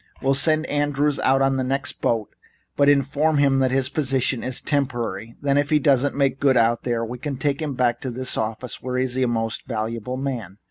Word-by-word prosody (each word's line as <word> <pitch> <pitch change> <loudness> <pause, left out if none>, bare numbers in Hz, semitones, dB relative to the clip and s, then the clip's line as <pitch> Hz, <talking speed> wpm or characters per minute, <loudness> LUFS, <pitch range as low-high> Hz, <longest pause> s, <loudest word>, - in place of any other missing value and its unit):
We'll 135 0 +1
send 155 +3 +4
Andrews 145 -1 0
out 135 +1 +3
on 135 0 +1
the 130 - 0
next 135 +2 -3
boat, 115 -3 -1 0.4
but 140 0 +4
inform 145 +2 +2
him 140 -1 +3
that 130 -1 +2
his 130 0 +1
position 135 -3 0
is 130 -1 -1
temporary. 120 -7 -2
Then 140 0 +2
if 145 - -1
he 155 - +4
doesn't 140 -1 +2
make 135 -1 +1
good 135 -3 +3
out 115 0 +2
there 120 -2 -2
we 120 +2 -7
can 140 0 -4
take 140 +2 -1
him 150 -4 -3
back 120 -2 +1
into 130 - -3
this 130 +1 0
office, 110 +3 -4
where 125 0 -3
he 130 - +2
is 125 -1 -2
a 130 -1 +1
most 115 -1 -2
valuable 115 +2 -4
man. 120 -8 -5
130 Hz, 220 wpm, -22 LUFS, 120-140 Hz, 0.4 s, send